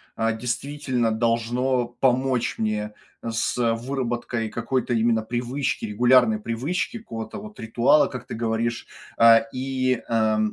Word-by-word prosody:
а, 115 0 +1
действительно 125 0 -2
должно 120 +3 +1
помочь 125 -1 0
мне, 105 -1 -2 0.3
э, 115 - -4
с, 115 - -1
э, 115 -2 +2
выработкой 120 -2 -3
какой-то 120 +2 -1
именно 115 0 +2
привычки, 125 +4 -2
регулярной 120 +1 +4
привычки, 135 - -2
какого-то 115 - -7
вот 210 0 -11
ритуала, 120 +6 +3
как 130 -2 -7
ты - - -7
говоришь. 115 0 -2 0.3
А, 115 0 +8 0.2
и, 130 -1 -1
а, 110 -2 +2
120 Hz, 130 wpm, -24 LUFS, 115-130 Hz, 0.3 s, А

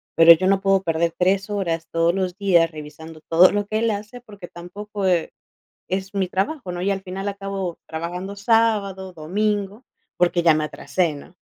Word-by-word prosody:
pero 165 0 +8
yo 185 +3 0
no 195 0 +3
puedo 195 -1 +3
perder 165 -1 0
3 195 +2 +1
horas 170 -5 -2
todos 165 0 +2
los 185 -1 -2
días 175 -5 +3
revisando 155 +1 -10
todo 170 +3 +6
lo 205 0 -1
que 215 +1 -1
él 230 -1 +1
hace, 210 +4 -6
porque 205 -6 -12
tampoco, 200 +3 -7
eh, 175 -3 +1 0.6
es 190 +1 -3
mi 190 -2 0
trabajo, 195 - -2
¿no?, 175 0 -5
y 195 - 0
al 195 - -4
final 190 +1 -5
acabo 195 -3 -4
trabajando 180 +5 -5
sábado, 200 -4 +1
domingo, 205 +6 -2 0.3
porque 175 -1 +2
ya 165 -2 +5
me 155 - 0
atrasé, 165 +1 -1
¿no? 145 +4 -13
190 Hz, 185 wpm, -22 LUFS, 170-200 Hz, 0.6 s, pero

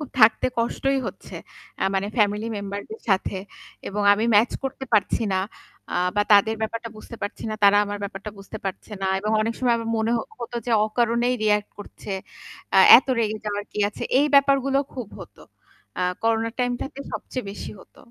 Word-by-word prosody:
খুব 300 - -6
থাকতে 220 +2 +6
কষ্টই 270 +4 0
হচ্ছে - - -8 0.5
আ - - +2
মানে 195 +1 0
family 210 +1 +2
member 200 0 -4
দের 220 - -8
সাথে। 190 0 +1 0.5
এবং 205 +1 -2
আমি 215 +3 +1
match 220 +4 +4
করতে 265 0 -4
পারছি 210 +1 +2
না। 190 - +1 0.5
আ - - -1 0.2
বা 205 - +4
তাদের 205 +2 +5
ব্যাপারটা 230 +1 -3
বুঝতে 230 - -10
পারছি 205 - -5
না। - - -2
তারা 200 0 +7
আমার 205 0 -5
ব্যাপারটা 200 +1 -7
বুঝতে 195 +2 -9
পারছে 195 +3 -6
না। 190 - +1
এবং 210 +2 -2
অনেক 225 +1 -2
সময় 245 -2 +2
আমার 230 0 -4
মনে 220 +1 0
হ - - 0 0.2
হত 235 -1 -7
যে 240 - 0
অকারণেই 235 +2 +1
react 210 -1 +1
করছে। 205 0 -8 0.6
আ - - +8 0.2
এত 260 - -5
রেগে 215 -1 0
যাওয়ার 205 -1 -3
কি - - -6
আছে? 210 - -9 0.2
এই 290 - +4
ব্যাপারগুলো 275 -1 +4 0.2
খুব 245 -6 -6
হতো। - - -13 0.6
আ - - +1 0.2
করোনা 225 0 +1
time 245 -1 +1
টাতে 275 0 -6
সবচেয়ে 255 - -5
বেশি 200 - -7
হত। - - -20
220 Hz, 190 wpm, -24 LUFS, 205-240 Hz, 0.6 s, আ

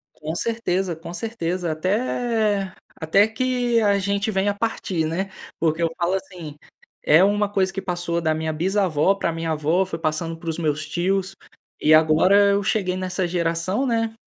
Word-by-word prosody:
Com 155 +1 -5
certeza, 190 -5 -1
com 165 +1 -9
certeza, 180 -6 -3
até 210 +2 0 0.3
até 195 +7 +4
que 245 0 0
a 200 -2 +3
gente 200 +2 -1
venha 195 0 +1
a - - -2
partir, 195 -6 -2
né. 190 +5 -2 0.3
Porque, 165 +1 0
eu 165 - +2
falo 175 +1 0
assim, 180 -6 -6 0.5
é 160 +5 +6
uma 205 0 +2
coisa 190 -1 0
que 195 - -4
passou 175 -2 -2
da 160 -1 +1
minha 160 0 -2
bisavó 185 0 +1
para 170 -4 -2
minha 165 0 -2
avó, 160 +5 +1
foi 165 -3 -5
passando 165 +1 -2
para 165 -1 -4
os 160 - -4
meus 155 -1 -1
tios, 190 +4 -1 0.5
e 155 - +5
agora 185 +6 +5
eu 200 0 +2
cheguei 190 -3 0
nessa 185 0 -2
geração, 175 +7 -1
né, 225 -2 0
185 Hz, 170 wpm, -22 LUFS, 165-200 Hz, 0.5 s, é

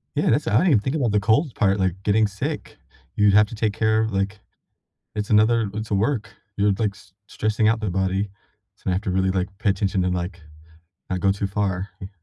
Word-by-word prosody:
Yeah. - - +1
That's - - +2
I 110 - +3
didn't 130 - +4
think 130 - -1
about 125 -8 +1
the 105 - +3
cold 115 +7 +2
part, 100 -2 +2
like, 95 0 -1
getting 105 +1 +3
sick. 100 0 -5 0.4
You'd 105 -1 +4
have 105 +1 +6
to 115 - -9
take 110 -1 0
care 110 0 +2
of 110 0 -1
like 100 +1 -2 0.8
it's 105 -1 -3
another 110 0 +3
it's 110 +1 -5
a - - +3
work. 110 +3 0 0.3
You're, 100 0 +3
like, 105 -3 0
s 100 -3 -19
stressing 110 0 0
out 115 +1 +2
their 110 -3 -2
body, 95 +2 -1 0.5
so - - -5
I - - +2
have 95 - -1
to 100 - -2
really, 95 0 +1
like, 95 0 -1
pay 105 - 0
attention 95 -1 0
to, 90 - +1
like, 90 0 -3 0.7
not 95 - -1
go 100 - +3
too 100 0 -2
far. 95 -1 -2
Yeah. 95 - -5
105 Hz, 225 wpm, -23 LUFS, 95-110 Hz, 0.8 s, have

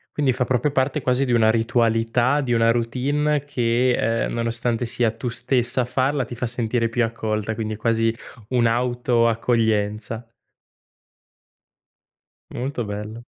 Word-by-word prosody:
Quindi 140 -3 +2
fa 125 0 0
proprio 130 +3 +1
parte 135 +2 0
quasi 125 +2 +1
di 125 - -2
una 110 -2 +4
ritualità, 115 +3 +1
di 125 -3 -1
una 115 0 +4
routine 140 +5 0
che, 125 -3 +1 0.3
ehm, - - -3
nonostante 115 +1 -1
sia 115 -1 +1
tu 115 +2 -5
stessa 120 +1 +1
a - - -1
farla, 130 +2 0
ti - - -9
fa 120 +1 -3
sentire 115 0 0
più 120 +1 0
accolta, 110 -1 -2
quindi 110 -1 -4
è - - -11
quasi 115 0 +1 0.4
un'auto 120 0 +2
accoglienza. 110 -1 0 2.2
Molto 125 0 -3
bello. 105 +3 -6
120 Hz, 140 wpm, -22 LUFS, 115-125 Hz, 2.2 s, una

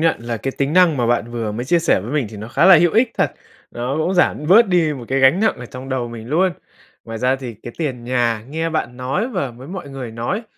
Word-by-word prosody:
nhận 165 0 +2
là 115 0 -4
cái 135 +5 -4
tính 140 +2 0
năng 180 -4 +5
mà 120 -2 0
bạn 120 -1 0
vừa 115 -3 -3
mới 120 +3 -4
chia 170 +6 +3
sẻ 165 - +2
với 115 +9 -7
mình 145 -6 0
thì 110 - -9
nó 110 +2 -8
khá 150 - +2
là 190 -2 +9
hữu 170 +1 +3
ích 230 +2 +3
thật, - - +1 0.4
nó 125 +4 -3
cũng 175 +4 0
giảm 165 -4 +1
bớt 225 +7 +6
đi 170 -4 +2
một 125 - -8
cái 135 - +1
gánh 135 +8 +5
nặng 220 - +2
ở 125 - -8
trong 130 +2 -9
đầu 130 -3 -2
mình 115 -1 -9
luôn. 180 +6 +2 0.5
Ngoài 115 0 -6
ra 125 +3 +1
thì 125 -3 -7
cái 120 - -8
tiền 130 -7 -3
nhà 120 -3 0
nghe 160 +2 -2
bạn 140 -7 -3
nói 135 - -2
và 180 - -3
với 125 +4 -12
mọi 185 -5 -7
người 130 -4 -6
nói, 120 - -3
135 Hz, 270 wpm, -19 LUFS, 120-165 Hz, 0.5 s, là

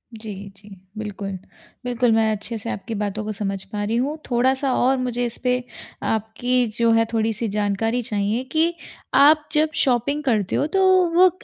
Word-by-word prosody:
जी, 215 -1 -7 0.2
जी, 205 +1 -15 0.3
बिल्कुल। 205 -2 -5 0.5
बिल्कुल, 245 -1 +1
मैं 220 0 +3
अच्छे 215 +2 -4
से 220 +2 -6
आपकी 225 +3 -5
बातों 210 +1 -2
को 215 - -3
समझ 195 -2 -3
पा 205 -1 -2
रही 215 +2 -1
हूँ 280 +5 -1
थोड़ा-सा 260 +2 +2
और 260 +2 +2
मुझे 245 -1 -1
इस 235 -1 -5
पे 250 0 +1 0.5
आपकी 240 +3 0
जो 230 -1 +3
है 225 0 +4
थोड़ी-सी 225 0 0
जानकारी 210 +4 0
चाहिए 215 +2 -1
कि 325 +2 +2 0.4
आप 300 +2 +5
जब 310 0 +2
शॉपिंग 275 +4 +1
करते 215 -8 +1
हो। 290 - +1
तो - - +4 0.3
वो 370 +1 +7
230 Hz, 175 wpm, -22 LUFS, 215-255 Hz, 0.5 s, वो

